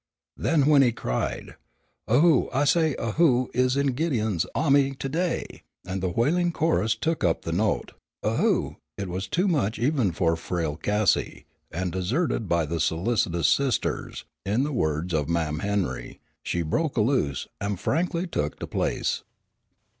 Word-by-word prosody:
Then 155 -4 +2
when 145 -1 +6
he 125 -3 +4
cried, - - -3 0.5
"A 125 +6 +4
who, 165 -6 +4
I 135 +3 +1
say, 160 -1 +3
a 115 - -2
who 130 -4 +3
is 125 +2 +2
in 140 -2 +1
Gideon's 115 - 0
ahmy 140 -2 +3
to 135 - -4
day?" 170 +5 -2 0.2
and 95 0 -4
the 95 - 0
wailing 170 - +1
chorus 155 -10 +1
took 160 +3 -1
up 85 -2 +1
the 85 - -3
note, 100 +5 0 0.3
"A - - 0
who!" - - +1 0.2
it 100 -2 -4
was 95 +2 -3
too 180 - +1
much 135 - +1
even 125 - +1
for 85 0 +1
frail 80 -2 -3
Cassie, 105 +3 0 0.2
and, 90 +2 -3
deserted 105 - -1
by 85 -1 +2
the 85 +2 -3
solicitous 85 0 +1
sisters, 135 -3 0 0.2
in 105 +7 +1
the 150 +1 -2
words 80 - -1
of 75 -1 0
Mam' 80 -2 0
Henry, 100 0 -2 0.2
"she 85 - -2
broke 145 - -1
a - - +4
loose, 105 - 0
and 100 -1 -2
faihly 170 - 0
tuk 75 +1 -2
de - - -5
place." - - -1
110 Hz, 165 wpm, -26 LUFS, 85-140 Hz, 0.5 s, when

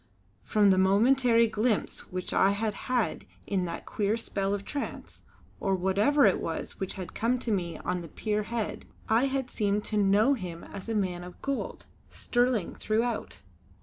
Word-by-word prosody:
From 205 -2 +3
the 185 - +4
momentary 230 +5 +4
glimpse 220 0 -1
which 185 0 -3
I 195 +1 +4
had 215 +1 -1 0.2
had 245 -4 0 0.2
in 190 -3 0
that 170 -1 -5
queer 210 +1 0
spell 195 -3 -2
of 200 0 -7
trance, 285 - -6 0.3
or 195 -1 +1
whatever 205 +10 +3
it 195 - +4
was 165 - -4
which 190 - -3
had 185 -3 -7
come 240 +3 +1
to 240 -2 -3
me 175 -5 -1
on 180 - -2
the 170 - -8
pier 210 +7 -1
head, 225 +1 -4 0.2
I 225 +4 +3
had 270 -2 -2
seemed 210 -1 0
to 215 - -2
know 205 +6 +4
him 180 -9 -5
as 200 +2 -8
a 225 - -1
man 180 -4 -1
of 180 0 -11
gold, 275 -1 -3 0.2
sterling 240 -6 0
throughout. 230 +3 -2
210 Hz, 175 wpm, -28 LUFS, 190-235 Hz, 0.3 s, the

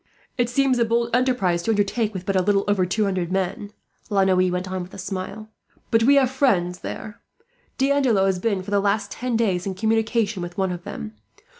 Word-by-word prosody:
"It 245 -1 0
seems 260 0 +2
a - - +4
bold 235 +1 +1
enterprise 245 -9 +1
to 200 - -4
undertake, 210 +1 +1
with 185 -3 -7
but 195 - -1
little 195 +2 +2
over 195 -3 +2
two 210 +4 0
hundred 185 -3 -1
men," 195 +3 -2 0.4
La 200 -2 +3
Noue 185 -1 +3
went 180 +1 -2
on 185 -1 -2
with 180 +1 -9
a - - -9
smile; 195 +3 -6 0.4
"but 225 - +4
we 275 +5 +5
have 265 -3 +4
friends 185 -10 +1
there. 215 +2 -7 0.6
D'Andelot 265 -7 +3
has 190 -2 +1
been, 195 -2 -1
for 200 - -8
the 200 - +3
last 200 +1 0
ten 245 -2 -2
days, 195 -5 0
in 190 - -3
communication 220 -1 0
with 175 0 -7
one 190 -1 0
of 175 +1 -6
them. 215 0 -6
205 Hz, 205 wpm, -23 LUFS, 185-230 Hz, 0.6 s, we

